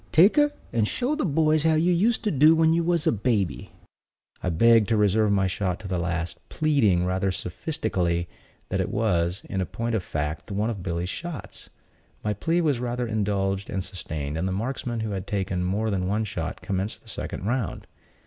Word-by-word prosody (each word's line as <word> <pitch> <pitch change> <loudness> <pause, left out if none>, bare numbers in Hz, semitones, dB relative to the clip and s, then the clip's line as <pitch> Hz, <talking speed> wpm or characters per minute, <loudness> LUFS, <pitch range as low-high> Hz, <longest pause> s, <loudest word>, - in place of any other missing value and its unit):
Take 185 - +6
her, 295 0 +5 0.2
and 110 -3 +2
show 255 - 0
the 305 -9 0
boys 155 0 +3
how 160 +1 +3
you 170 +3 +3
used 220 +7 +2
to 210 - +1
do 155 +3 +6
when 160 0 +4
you 170 0 +2
was 170 -2 +1
a - - +4
baby." 105 -4 -1 0.7
I 90 - -1
begged 115 +5 +5
to 115 - +3
reserve 105 +1 +3
my 100 -1 +3
shot 95 -1 -1
to 100 - -7
the 90 -2 -1
last; 85 -1 -2
pleading, 120 - +2
rather 95 +1 0
sophistically, 90 - -2 0.4
that - - 0
it - - -2
was, 90 -3 0
in 95 -2 -1
point 115 +5 -3
of 110 - +1
fact, 75 +2 -3
one 105 +4 0
of 110 - -4
the - - -8
Billy's 85 -1 -2
shots. 170 - -7 0.5
My 105 - 0
plea 165 - 0
was 145 -7 +1
rather 125 0 -2
indulged 100 -3 -1
than 95 - -2
sustained, 80 -6 -4
and 90 - -1
the - - -1
marksmen 120 +3 -2
who 110 -1 -2
had 95 -2 -4
taken 95 -3 -1
more 105 +4 0
than 90 -2 -1
one 105 +3 0
shot 105 - -4
commenced 95 +2 -3
the - - -22
second - - -5
round. 120 -1 -2
105 Hz, 200 wpm, -25 LUFS, 95-140 Hz, 0.7 s, Take